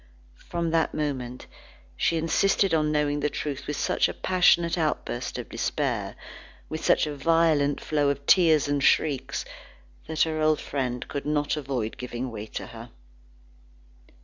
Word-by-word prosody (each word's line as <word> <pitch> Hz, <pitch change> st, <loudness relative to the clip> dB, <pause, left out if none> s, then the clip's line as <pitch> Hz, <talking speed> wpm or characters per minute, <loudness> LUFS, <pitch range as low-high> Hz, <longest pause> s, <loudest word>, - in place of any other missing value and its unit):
From 170 Hz, -1 st, -1 dB
that 165 Hz, -1 st, +1 dB
moment, 130 Hz, -5 st, -3 dB, 0.5 s
she 165 Hz, -, +1 dB
insisted 195 Hz, +3 st, +2 dB
on 155 Hz, -1 st, +2 dB
knowing 145 Hz, -1 st, +1 dB
the 150 Hz, +1 st, 0 dB
truth 145 Hz, -1 st, -5 dB
with 150 Hz, -1 st, -3 dB
such -, -, +1 dB
a -, -, -6 dB
passionate 180 Hz, -2 st, +3 dB
outburst 155 Hz, -, -2 dB
of -, -, -6 dB
despair, -, -, -2 dB, 0.5 s
with 155 Hz, -, -5 dB
such -, -, +3 dB
a 150 Hz, -1 st, -4 dB
violent 150 Hz, -1 st, +2 dB
flow 145 Hz, -2 st, +1 dB
of 140 Hz, 0 st, -3 dB
tears 160 Hz, -5 st, +5 dB
and 145 Hz, -1 st, 0 dB
shrieks, 140 Hz, -2 st, +1 dB, 0.6 s
that 160 Hz, -, +2 dB
her 155 Hz, -1 st, -2 dB
old 155 Hz, 0 st, +3 dB
friend 125 Hz, -3 st, -3 dB
could 140 Hz, 0 st, -5 dB
not 145 Hz, 0 st, 0 dB
avoid 130 Hz, -7 st, -3 dB
giving 125 Hz, 0 st, -5 dB
way 110 Hz, -1 st, -7 dB
to -, -, -6 dB
her. -, -, -10 dB
150 Hz, 150 wpm, -26 LUFS, 140-160 Hz, 0.6 s, tears